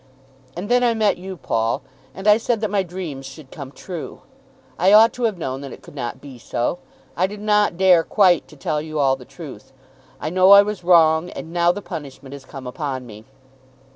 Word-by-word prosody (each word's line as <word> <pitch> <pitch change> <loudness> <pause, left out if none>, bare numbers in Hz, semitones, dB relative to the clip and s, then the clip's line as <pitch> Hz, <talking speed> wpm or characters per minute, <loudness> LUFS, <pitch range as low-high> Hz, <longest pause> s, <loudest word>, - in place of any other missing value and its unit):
And 185 +4 -4
then 245 +2 +3
I 235 -1 +2
met 210 -4 +1
you, 190 0 -7
Paul, 115 -6 -1 0.3
and 195 +2 -5
I 210 0 +7
said 230 0 -1
that 215 -3 -2
my 205 -1 +2
dreams 175 -7 -6
should 135 +1 -12
come 140 -3 -9
true. 175 +2 -8 0.6
I 185 +4 +4
ought 225 +2 +7
to 245 - -2
have 215 -5 -1
known 135 -5 -4
that 140 -2 -8
it - - -12
could - - -14
not 120 -5 -5
be 135 -4 -12
so. 120 +9 -2 0.4
I 185 +2 +1
did 205 +1 -9
not 210 -3 +1
dare 185 -2 +5
quite 185 -4 +3
to 155 - -16
tell 150 +2 -2
you 155 0 -6
all 135 -2 +3
the 130 -2 -13
truth. 135 -11 -11 0.5
I 155 - -4
know 185 +2 +6
I 200 0 +9
was 210 -3 -5
wrong, 165 -1 +4
and 165 - -9
now 175 0 +3
the 205 +2 -7
punishment 140 -5 -8
has 140 -2 -10
come 135 -1 -10
upon 130 0 -4
me. 110 -1 -12
170 Hz, 215 wpm, -21 LUFS, 140-200 Hz, 0.6 s, I